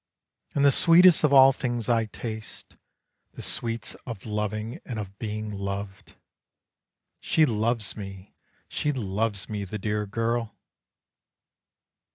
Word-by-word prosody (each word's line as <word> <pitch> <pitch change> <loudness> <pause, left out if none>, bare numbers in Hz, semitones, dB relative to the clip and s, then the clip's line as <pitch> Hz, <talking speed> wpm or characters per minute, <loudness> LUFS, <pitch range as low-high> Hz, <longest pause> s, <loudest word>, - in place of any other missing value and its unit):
And 140 - +3
the 140 - +7
sweetest 170 +4 +6
of 150 - +4
all 135 -1 +8
things 120 -4 -3
I 115 -2 +2
taste, 110 0 -8 0.6
The - - -8
sweets 115 -2 -2
of 115 -5 -7
loving 105 +1 -3
and 120 - -6
of 100 -2 -7
being 110 -1 -4
loved! 100 -2 -6 1.0
"She 160 - +3
loves 115 -2 0
me, 95 -2 -9 0.3
she 150 - -1
loves 105 -4 -2
me, 105 -2 -4
the 100 +2 -5
dear 105 0 -2
girl! 115 +2 -2
110 Hz, 125 wpm, -26 LUFS, 105-120 Hz, 1.0 s, all